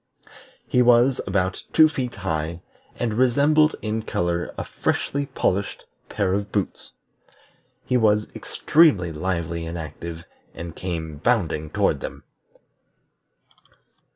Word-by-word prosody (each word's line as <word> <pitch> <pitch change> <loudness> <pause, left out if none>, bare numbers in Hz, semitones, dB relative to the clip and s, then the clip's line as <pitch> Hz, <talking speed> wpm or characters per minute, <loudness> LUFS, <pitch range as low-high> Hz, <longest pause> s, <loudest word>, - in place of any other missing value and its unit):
He 125 - +3
was 125 +2 +5
about 95 -1 0
two 155 -1 +7
feet 130 -5 -4
high, 80 0 -2 0.3
and 115 -3 -1
resembled 145 +6 +4
in 110 0 -1
color 85 -4 -1
a - - -2
freshly 140 0 -2
polished 100 -7 -1 0.2
pair 100 -3 0
of 100 +1 -2
boots. 100 -2 -3 0.9
He 125 - +2
was 105 -2 +3
extremely 110 - +3
lively 85 0 -2
and 85 +1 -5
active, 80 +1 -7 0.3
and 85 -1 -7
came 80 -4 -4
bounding 80 -6 0
toward - - +1
them. - - -7
100 Hz, 115 wpm, -23 LUFS, 85-125 Hz, 0.9 s, two